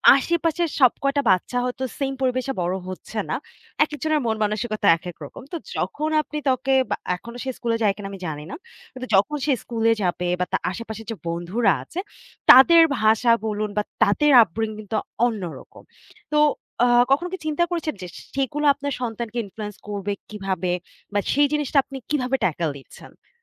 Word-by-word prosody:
আশেপাশের 335 +3 0
সব 255 -3 +7
কয়টা 280 +1 +2
বাচ্চা 185 +7 0
হয়তো, 250 +1 -3
সেইম 270 -2 -1
পরিবেশে 255 +1 0
বড় 180 +2 0
হচ্ছে 185 - -8
না। - - 0 0.5
একেকজনের 305 +1 -1
মন-মানসিকতা 215 0 -1
একেক 175 0 -8
রকম। 140 - -11
তো 340 - -2 0.2
যখন 305 +1 -2
আপনি 300 0 -7
তাকে 260 +1 +1 0.2
বা - - +1 0.2
এখনো 235 +6 -10
সে 265 - -3
স্কুলে 230 -1 -1
যায় 200 -2 +3
কিনা, 205 -1 -7
আমি 195 - -8
জানি 150 -1 -5
না। - - -5 0.4
কিন্তু 255 0 -7
যখন 295 +10 +2
সে 285 - +3
স্কুলে 230 -1 +1
যাবে, 180 0 -1
বা 180 - +1
তার - - 0
আশেপাশের 220 +1 -7
যে - - -3
বন্ধুরা 180 +6 +1
আছে, 345 - -7 0.5
তাদের 330 +6 +9 0.2
ভাষা 220 +2 +4
বলুন 210 0 -2
বা 210 - +2 0.2
তাদের 290 +9 +3
আপব্রিঙগিং 215 +3 -4
তো - - +2 0.3
অন্যরকম। 200 -8 -5 0.5
তো 300 - +4 0.5
আ - - +4 0.2
কখনো 345 +6 +3
কি - - -2
চিন্তা 310 +2 +1
করেছেন 330 -3 -2
যে, 180 - -6 0.3
সেগুলো 275 +2 -1
আপনার 285 0 -4
সন্তানকে 235 0 -4
ইনফ্লুয়েন্স 210 +1 -7
করবে 205 0 -3 0.2
কিভাবে 190 -4 -2 0.4
বা 205 - +2
সেই 290 +1 +4
জিনিসটা 295 -1 0
আপনি 270 0 -9
কিভাবে 270 -3 0
ট্যাকেল 165 -1 0
দিচ্ছেন? 135 - -16
235 Hz, 170 wpm, -23 LUFS, 205-280 Hz, 0.5 s, তাদের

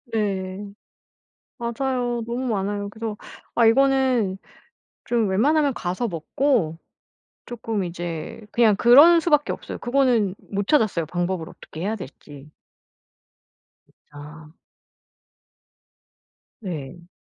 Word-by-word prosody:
예. 195 -2 -2 0.9
맞아요. 240 0 -2
너무 245 +3 -3
많아요. 205 -2 -2
그래서 220 0 -5 0.4
아 235 - +4
이거는 255 -5 +3 0.7
좀 230 -4 +1
웬만하면 280 +7 +2
가서 185 +7 -2
먹고 170 - 0 0.7
쪼끔 225 -4 -3
이제 175 +3 -6
그냥 225 -3 +4
그러는 285 +11 +7
수밖에 300 -3 +2
없어요. - - -6
그거는 240 -6 +2
못 200 0 -5
찾았어요, 215 - +2
방법을 175 0 -2
어떻게 160 - -11
해야 210 +4 -1
될지. 145 -3 -11 1.3
진짜. 150 +1 -14 2.1
네. 175 -3 -7
210 Hz, 215 characters per minute, -23 LUFS, 180-245 Hz, 2.1 s, 그러는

